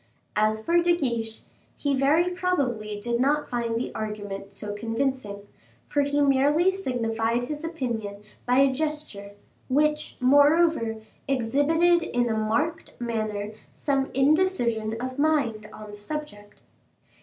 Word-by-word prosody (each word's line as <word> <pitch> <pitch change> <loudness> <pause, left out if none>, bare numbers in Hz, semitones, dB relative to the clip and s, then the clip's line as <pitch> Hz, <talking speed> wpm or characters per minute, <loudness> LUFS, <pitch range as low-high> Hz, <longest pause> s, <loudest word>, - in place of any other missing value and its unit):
As 215 +1 +1
for 345 +1 +4
De 345 0 +3
Guiche, 230 -6 -2 0.3
he 285 -1 0
very 305 +7 +3
probably 250 - -1
did 235 +2 -1
not 290 +3 +2
find 235 -2 -2
the 235 - -3
argument 205 -2 -5
so 205 +1 -5
convincing, 225 -2 -3 0.4
for 290 - +1
he 285 +1 0
merely 285 +6 +4
signified 235 -9 -1
his 300 +4 -5
opinion 230 -11 -4 0.2
by 250 +1 +3
a 275 0 +5
gesture, 295 -9 -4 0.4
which, 300 +3 +1
moreover, 285 -2 +4 0.3
exhibited 290 +7 +3
in 245 -5 0
a 220 - 0
marked 290 +10 -1
manner 215 -3 -3 0.2
some 275 -2 0
indecision 265 -8 +2
of 255 +2 -5
mind 270 -9 +1
on 215 -1 -10
the - - -8
subject. 205 -3 -7
255 Hz, 130 wpm, -26 LUFS, 220-300 Hz, 0.4 s, a